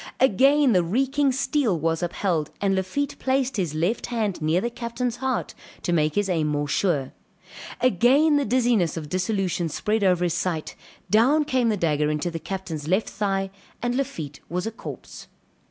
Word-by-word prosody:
Again 270 +3 +4
the 180 - +4
reeking 270 +9 +1
steel 265 - +1
was 165 +2 0
upheld, 175 -3 -1
and 200 -1 +1
Lafitte 190 +10 -2
placed 265 -2 0
his 170 -6 -1
left 175 +9 0
hand 215 -7 -2
near 155 +3 +2
the 235 +5 -2
Captain's 235 0 -3
heart, 265 -2 -2 0.3
to 175 - 0
make 155 -2 +1
his 205 -1 +1
aim 165 -5 0
more 145 -1 -1
sure; 145 -4 0 0.7
again 260 - +4
the 285 - +2
dizziness 235 -8 +2
of 150 -2 -6
dissolution 185 -2 -1
spread 210 +7 -1
over 180 -2 +3
his 175 -2 +1
sight, 170 -3 -2 0.4
down 265 +8 +4
came 255 -5 +1
the 215 - +1
dagger 150 -4 +1
into 150 +3 -1
the 165 - -4
captain's 170 -5 -5
left 190 +6 +1
thigh 195 -2 -1 0.3
and 245 0 -1
Lafitte 170 - -4
was 180 +3 -2
a 225 - -2
corpse. 225 - -9
195 Hz, 170 wpm, -24 LUFS, 170-245 Hz, 0.7 s, Again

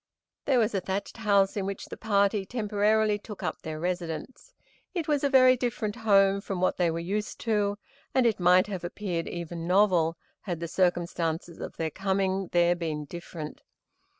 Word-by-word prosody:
There 270 - +3
was 225 -1 +2
a 195 - 0
thatched 195 +4 -4
house 200 -3 +3
in 195 -2 -2
which 195 - -5
the - - -8
party 200 -1 +1
temporarily 210 0 +1
took 210 -1 -9
up - - -3
their 155 -1 -5
residence. 175 - -4 0.4
It 335 -4 -2
was 295 -2 +1
a 280 - +3
very 255 -1 +6
different 230 -3 -2
home 200 -3 +4
from 195 -2 -4
what 185 - +1
they 180 - +2
had 165 -1 +1
been 170 0 -4
used 210 +3 -2
to, 205 -2 0 0.3
and 260 -2 +3
it 225 -4 +2
might 180 +1 +5
have 195 -4 -5
appeared 175 -1 -3
even 170 -1 -5
novel, 180 -4 +3 0.2
had 175 -5 -4
the 170 - -4
circumstances 170 -2 -1
of - - -7
their 160 -1 -2
coming 190 0 0
there 175 0 +4
been 155 -3 -3
different. 165 -1 -8
195 Hz, 180 wpm, -28 LUFS, 175-210 Hz, 0.4 s, very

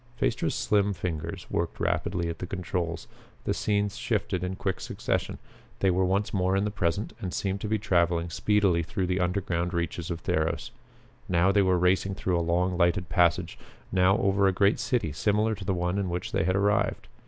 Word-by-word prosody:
Phaestra's - - 0
slim 100 -1 +2
fingers 85 0 -4
worked 85 -1 -2
rapidly 85 -1 0
at 85 0 -5
the 90 - -4
controls. 90 -2 -3 0.4
The - - 0
scenes 105 -1 0
shifted 90 -1 -1
in 90 +1 -2
quick 95 -1 -2
succession. - - -2 0.4
They 95 - +2
were 95 +1 +2
once 95 +3 0
more 95 -1 +1
in 95 - +2
the 105 - -1
present, 100 +1 -1
and 95 - -3
seemed 95 +1 -2
to - - -3
be 110 +1 +1
traveling 85 -4 +1
speedily 100 -2 +2
through 90 +3 -2
the 90 +1 0
underground 90 -1 -1
reaches 85 -1 -2
of 85 -1 -4
Theros. 80 +1 -1 0.6
Now 90 +2 +4
they 100 +1 +4
were 95 -1 +3
racing 95 +2 +2
through 90 -2 0
a - - +1
long 90 +2 +1
lighted 85 +1 +2
passage; 85 0 +2 0.3
now 95 +1 +4
over 100 0 +2
a - - +4
great 100 +4 +2
city 125 - 0
similar 105 +8 +1
to 95 -3 -7
the 95 -1 0
one 90 +2 -1
in 95 -2 -1
which 85 0 -3
they - - +1
had 95 +1 +1
arrived. 100 +1 +1
90 Hz, 195 wpm, -27 LUFS, 85-100 Hz, 0.6 s, Now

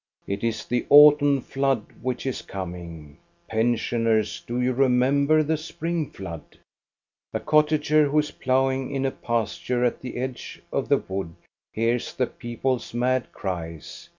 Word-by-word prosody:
It 100 +2 -4
is 115 -2 -1
the 120 -1 -1
autumn 145 -1 +7
flood 135 -5 0 0.2
which 125 +1 -3
is 130 - -2
coming. 85 -5 -8 0.3
Pen 115 +2 +2
sioners, 115 -2 0
do 120 +1 -3
you 125 +1 +1
remember 135 +4 +3
the 155 +1 0
spring 165 0 -3
flood? 85 - -9 0.8
A - - +1
cottager 150 0 +3
who 145 +2 0
is 150 -1 +2
ploughing 130 0 0
in 135 -1 -2
a 135 - +1
pasture 120 +2 -1
at 120 - -1
the 125 -1 -6
edge 130 0 -5
of - - -1
the - - +5
wood 95 -4 -5 0.4
hears 115 +2 -1
the 130 - +1
people's 120 +1 -3
mad 125 +1 0
cries. 85 -5 -6
125 Hz, 150 wpm, -25 LUFS, 110-140 Hz, 0.8 s, autumn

